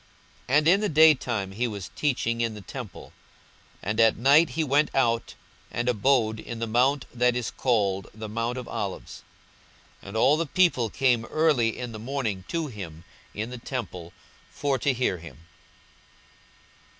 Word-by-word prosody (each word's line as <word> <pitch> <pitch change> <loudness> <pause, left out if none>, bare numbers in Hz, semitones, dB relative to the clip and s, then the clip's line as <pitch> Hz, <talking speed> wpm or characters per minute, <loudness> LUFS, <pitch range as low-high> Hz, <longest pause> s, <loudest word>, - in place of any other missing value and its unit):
42:021:037 140 - +5
And 150 +1 +2
in 195 +4 +5
the 210 - 0
day 155 +1 +7
time 110 -8 -3
he 120 +5 -1
was 100 -4 -7
teaching 120 -5 0
in 115 -2 -1
the 105 - -9
temple; 120 - -9 0.7
and 105 +3 -2
at 115 -1 +5
night 145 +7 +5
he 160 - -1
went 145 +1 +2
out, 115 -3 +1 0.3
and 120 +1 -3
abode 115 -1 +2
in 120 - -7
the 115 - -2
mount 125 +5 +2
that 125 0 +2
is 125 -2 -2
called 100 -7 0
the 110 +1 -8
mount 115 +3 -2
of 125 - -6
Olives. - - -5 0.8
42:021:038 - - -15
And 100 +3 -5
all 140 +6 +4
the 165 - 0
people 150 -9 +2
came 125 -2 +1
early 140 -6 +1
in 125 -1 -5
the 110 - -8
morning 115 -6 -3
to 165 -1 -2
him 90 - -8 0.3
in 110 +4 -4
the 125 - -7
temple, 95 -10 -6 0.4
for 140 -2 -1
to 140 - +2
hear 120 -8 -1
him. 85 0 -13
120 Hz, 175 wpm, -26 LUFS, 110-140 Hz, 0.8 s, day